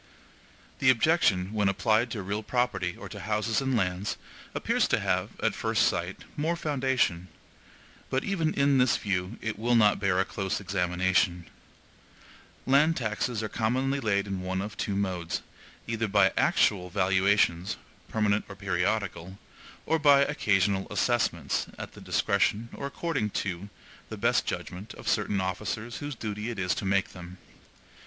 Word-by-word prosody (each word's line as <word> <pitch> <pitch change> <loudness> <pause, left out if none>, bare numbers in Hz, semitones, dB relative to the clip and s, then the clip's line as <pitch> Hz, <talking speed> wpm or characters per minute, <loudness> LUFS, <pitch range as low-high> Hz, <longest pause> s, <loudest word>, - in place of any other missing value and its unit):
The 130 - +4
objection, 115 - +3
when 105 -2 +2
applied 110 +4 +2
to 110 -4 -4
real 100 +3 -2
property 110 -7 -1
or - - -8
to - - -8
houses 110 +3 0
and 135 -2 +1
lands, 90 0 -1 0.4
appears - - +1
to - - +2
have, - - -1
at - - +2
first - - +1
sight, - - -3
more 160 +3 0
foundation, 130 - 0 0.8
but 130 - 0
even 170 -6 0
in 140 -1 +3
this 125 -2 +4
view 95 +1 -2
it 110 -2 -3
will 120 +2 +2
not 105 -3 +5
bear 95 -2 +1
a 95 - +2
close 95 -2 -3
examination. 90 -2 0 1.2
Land 150 +5 +4
taxes 110 -1 -2
are - - -1
commonly 130 +6 0
laid 100 -5 +1
in 95 -2 -4
one 95 0 -2
of 105 +2 -5
two 100 -2 -2
modes, 90 -4 -2 0.4
either 115 -1 -1
by 100 +1 +4
ACTUAL 90 -3 +2
valuations, 95 -1 +2 0.3
permanent 105 -1 +1
or 100 - -8
periodical, 95 -1 -2 0.5
or 160 - +1
by 140 -2 +6
OCCASIONAL 100 -8 +1
assessments, 85 - 0
at - - -7
the - - -13
discretion, 115 +3 +1
or 140 - -4
according 140 -6 -2
to 100 -1 -3 0.4
the - - -6
best - - +2
judgment, 95 +5 -5
of - - -11
certain 100 - +1
officers 105 +5 -3
whose 145 -1 -5
duty 105 0 -4
it 120 - -5
is 90 -1 +1
to 100 - -4
make 95 0 +1
them. 90 0 -10
105 Hz, 155 wpm, -28 LUFS, 95-120 Hz, 1.2 s, by